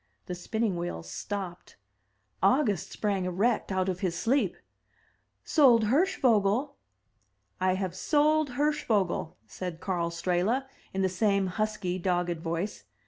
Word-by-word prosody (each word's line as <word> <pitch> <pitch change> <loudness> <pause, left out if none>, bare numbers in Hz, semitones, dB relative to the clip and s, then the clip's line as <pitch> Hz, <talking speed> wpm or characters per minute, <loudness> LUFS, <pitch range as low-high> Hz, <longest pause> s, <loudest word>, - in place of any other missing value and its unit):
The 180 - -5
spinning 200 +2 -1
wheel 170 - -4
stopped. 180 - -6 0.7
August 255 -7 +2
sprang 200 -3 -1
erect 200 +5 0
out 190 0 0
of 185 -1 -2
his 180 -3 -1
sleep. 260 +9 +1 0.9
"Sold 250 -7 +5
Hirschvogel!" 255 - +2 0.8
"I 185 0 +2
have 190 -2 -2
sold 300 +4 +2
Hirschvogel!" 225 - 0
said 180 -3 -6
Karl 175 -3 -1
Strehla, 180 +9 0 0.3
in 190 0 -1
the - - +4
same 195 +1 +1
husky, 190 -1 -2
dogged 175 -2 0
voice. 170 - -3
195 Hz, 120 wpm, -28 LUFS, 180-230 Hz, 0.9 s, Sold